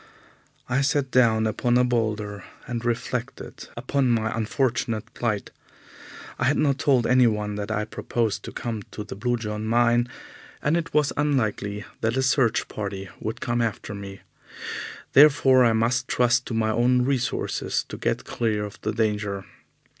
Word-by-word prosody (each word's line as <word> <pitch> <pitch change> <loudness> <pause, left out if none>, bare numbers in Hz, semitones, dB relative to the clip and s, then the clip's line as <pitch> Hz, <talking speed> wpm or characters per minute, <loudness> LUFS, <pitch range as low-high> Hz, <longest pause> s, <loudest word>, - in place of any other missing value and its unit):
I 130 +2 +1
sat 140 -1 +1
down 115 -3 +4
upon 120 +3 +1
a 125 - +4
boulder 105 -5 -1 0.2
and 120 -1 -4
reflected 120 +1 -4
upon 130 +2 0
my 110 -2 +1
unfortunate 115 0 -1
plight. 110 -4 -2 0.9
I 120 - +1
had 140 +3 +3
not 140 -2 +2
told 135 -6 +3
anyone 110 -5 +3
that 105 0 -4
I 105 -1 -1
proposed 115 0 -2
to - - -6
come 115 -3 -4
to 105 - -5
the 105 - -8
Blue 120 +4 0
John 105 -1 -4
mine, 120 +2 +3 0.5
and 150 +3 +1
it 170 -1 -2
was 150 -2 +3
unlikely 110 -8 0
that 115 +3 0
a 130 - +2
search 130 -3 +2
party 100 -2 -5
would 110 +2 -5
come 120 -1 0
after 110 -2 -3
me. 100 -1 -8 0.9
Therefore 135 -3 +6
I 115 -2 +4
must 120 +3 +1
trust 125 +1 +2
to 115 - -3
my 110 -1 +1
own 125 +2 +3
resources 130 -3 -1
to - - -7
get - - -2
clear 110 -3 -1
of 100 - -10
the - - -2
danger. 105 -3 -1
115 Hz, 160 wpm, -25 LUFS, 110-125 Hz, 0.9 s, Therefore